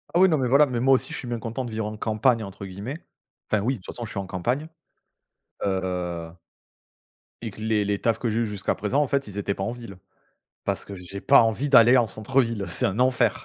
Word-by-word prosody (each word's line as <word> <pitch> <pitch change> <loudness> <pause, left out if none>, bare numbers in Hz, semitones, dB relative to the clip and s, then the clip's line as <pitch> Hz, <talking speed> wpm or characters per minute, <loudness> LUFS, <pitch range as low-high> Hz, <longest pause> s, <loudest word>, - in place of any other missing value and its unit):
Ah - - +5
oui 190 - +7
non 155 -5 +2
mais 130 - +1
voilà, 140 +4 +6
mais 125 -4 -3
moi 135 +2 +5
aussi, 130 - -2
je - - -3
suis 125 - -6
bien 120 0 -2
content 115 +3 -4
de 120 - -6
vivre 110 0 -2
«en 105 0 -5
campagne» 110 +2 +1
entre 100 0 -8
guillemets 100 - -7 0.5
enfin 110 - +2
oui 130 +4 +1
de - - -11
toute - - -9
façon, 120 - -5
je - - -9
suis - - -7
en 100 - -4
campagne, 120 - -2 1.0
heu 90 -3 -2 1.1
et 115 -2 -5
que 105 - -12
les 110 -2 +1
les 100 0 -1
tafs 115 -1 0
que 120 - -1
j'ai 110 +1 0
eus 115 - +1
jusqu'à 105 -3 -2
présent 105 +8 0
en 145 - +1
fait, 140 -1 0
ils 100 -1 -7
étaient 100 0 -1
pas 95 - -4
en 100 - -2
ville. 115 -5 -9 0.7
Parce - - -2
que 100 - -8
j'ai 90 +2 -8
pas 140 - +7
envie 115 +6 0
d'aller 125 -1 +7
en 120 - +3
centre-ville, 115 -1 0
c'est - - +2
un 95 +3 -2
enfer. 130 0 +2
115 Hz, 250 wpm, -25 LUFS, 100-125 Hz, 1.1 s, oui